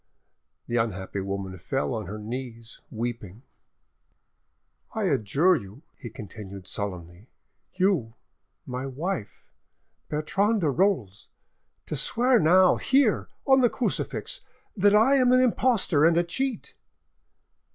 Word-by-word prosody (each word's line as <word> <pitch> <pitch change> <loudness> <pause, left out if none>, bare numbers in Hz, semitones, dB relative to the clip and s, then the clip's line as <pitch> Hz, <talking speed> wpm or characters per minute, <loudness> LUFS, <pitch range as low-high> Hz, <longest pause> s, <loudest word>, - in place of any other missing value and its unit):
The 120 - -2
unhappy 100 -3 -2
woman 95 -1 -5
fell 135 +9 -2
on 110 -5 -4
her 105 +3 -6
knees, 115 +1 -7
weeping. 115 -2 -5 1.5
"I 220 - -1
adjure 145 - +2
you," 110 - -8
he 120 - -9
continued 100 -3 -10
solemnly, 90 0 -6 0.5
"you, 180 - +1 0.5
my 125 +1 -5
wife, 135 - -5 0.6
Bertrande 195 +8 0
de 155 -4 +2
Rolls, 135 - 0 0.6
to - - -4
swear 245 +1 +2
now, 180 +3 +5
here, 265 -5 +2 0.2
on 265 -1 +5
the 245 -2 +4
crucifix, - - -2 0.3
that 205 0 +4
I 250 +6 +5
am 250 -2 +4
an 255 - +5
impostor 235 - +2
and 165 +1 +4
a 175 - +4
cheat." 250 +8 -3
140 Hz, 120 wpm, -26 LUFS, -, 1.5 s, now